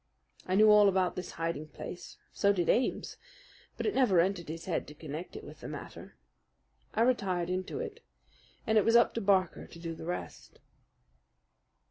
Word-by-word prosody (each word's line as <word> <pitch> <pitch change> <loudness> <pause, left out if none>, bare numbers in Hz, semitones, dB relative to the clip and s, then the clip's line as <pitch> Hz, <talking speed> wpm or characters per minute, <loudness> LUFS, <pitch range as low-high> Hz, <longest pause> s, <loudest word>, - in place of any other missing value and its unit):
I 185 - +1
knew 215 +1 +7
all 210 -1 +7
about 185 -2 +1
this 180 - -6
hiding 165 -2 -3
place, 175 - -9 0.2
so 200 - +3
did 180 -4 0
Ames; 250 - +1 0.6
but - - -3
it 425 - +1
never 220 -10 +4
entered 175 -2 0
his 165 +1 -6
head 175 - -2
to 150 - -11
connect 155 +3 -7
it - - -7
with - - -11
the - - -8
matter. - - -9 0.8
I 225 - +4
retired 185 -8 +1
into 185 0 -3
it, 465 -1 -6 0.6
and 220 -1 +4
it - - +2
was 230 - +3
up 235 - +5
to 230 - -2
Barker 190 -3 +1
to - - -13
do 165 0 -5
the 160 - -9
rest. 180 - -6
185 Hz, 180 wpm, -31 LUFS, 170-215 Hz, 0.8 s, knew